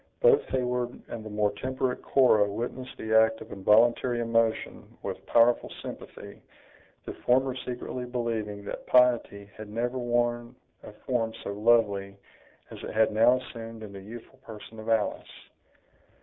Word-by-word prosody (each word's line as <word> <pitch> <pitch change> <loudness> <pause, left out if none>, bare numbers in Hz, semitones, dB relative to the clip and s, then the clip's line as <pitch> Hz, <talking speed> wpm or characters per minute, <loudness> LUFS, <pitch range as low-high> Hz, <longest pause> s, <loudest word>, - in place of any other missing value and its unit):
Both - - +5
Heyward 125 -1 -2
and 110 - -6
the 110 - -8
more 105 -1 +1
temperate 130 +4 -3
Cora 110 -6 +4
witnessed 125 +4 -5
the 110 0 -3
act 110 0 +4
of - - -11
involuntary 115 +5 +3
emotion 115 -1 -1
with - - -5
powerful 120 +1 +3
sympathy, - - -9 0.6
the - - -5
former 130 +1 +1
secretly 125 0 -5
believing 115 -4 -3
that - - -7
piety 120 -5 +3
had 110 -1 -9
never 120 +4 -2
worn 120 0 -1 0.3
a - - -11
form 115 -3 -1
so 100 - -4
lovely 100 -3 +2 0.5
as - - -9
it - - -6
had 110 0 +4
now 115 +4 +5
assumed 115 -3 -9
in 100 -2 -9
the 100 - -9
youthful 115 +5 -11
person 110 -2 -11
of 110 - -7
Alice. 110 -2 -1
115 Hz, 150 wpm, -27 LUFS, 110-125 Hz, 0.6 s, Both